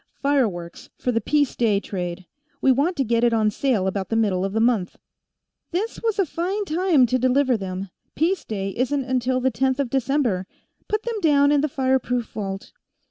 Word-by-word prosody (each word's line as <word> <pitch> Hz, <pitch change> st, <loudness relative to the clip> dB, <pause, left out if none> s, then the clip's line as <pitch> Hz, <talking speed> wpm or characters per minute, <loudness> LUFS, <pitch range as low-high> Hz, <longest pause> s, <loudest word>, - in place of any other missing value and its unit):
"Fireworks, 220 Hz, -12 st, -1 dB
for 250 Hz, -, -1 dB
the 230 Hz, -1 st, 0 dB
Peace 290 Hz, +4 st, +1 dB
Day 215 Hz, -4 st, +2 dB
trade. 180 Hz, -2 st, -5 dB, 0.3 s
We 265 Hz, -, +4 dB
want 290 Hz, +8 st, +1 dB
to 275 Hz, -, +2 dB
get 235 Hz, -1 st, +1 dB
it 240 Hz, -1 st, +4 dB
on 215 Hz, -2 st, +2 dB
sale 230 Hz, -4 st, 0 dB
about 190 Hz, 0 st, -2 dB
the 225 Hz, -, -1 dB
middle 200 Hz, -5 st, +1 dB
of 195 Hz, 0 st, -2 dB
the 220 Hz, -, +1 dB
month." 225 Hz, -6 st, +1 dB, 0.7 s
"This 395 Hz, +7 st, -3 dB
was 450 Hz, -3 st, 0 dB
a 390 Hz, -, +3 dB
fine 370 Hz, +7 st, -2 dB
time 335 Hz, -5 st, +3 dB
to 255 Hz, +2 st, 0 dB
deliver 255 Hz, +1 st, +3 dB
them. 190 Hz, -2 st, -5 dB, 0.2 s
Peace 355 Hz, +5 st, +1 dB
Day 195 Hz, -2 st, -3 dB
isn't 260 Hz, +2 st, 0 dB
till 255 Hz, +1 st, 0 dB
the 260 Hz, +1 st, +1 dB
Tenth 265 Hz, +1 st, 0 dB
of 265 Hz, -4 st, -1 dB
December. 255 Hz, -8 st, 0 dB, 0.4 s
Put 425 Hz, 0 st, -1 dB
them 465 Hz, -2 st, -3 dB
down 285 Hz, -3 st, +4 dB
in 290 Hz, -1 st, +3 dB
the 305 Hz, -, 0 dB
fireproof 260 Hz, -3 st, 0 dB
vault." 195 Hz, -2 st, -5 dB
255 Hz, 190 wpm, -23 LUFS, 210-285 Hz, 0.7 s, We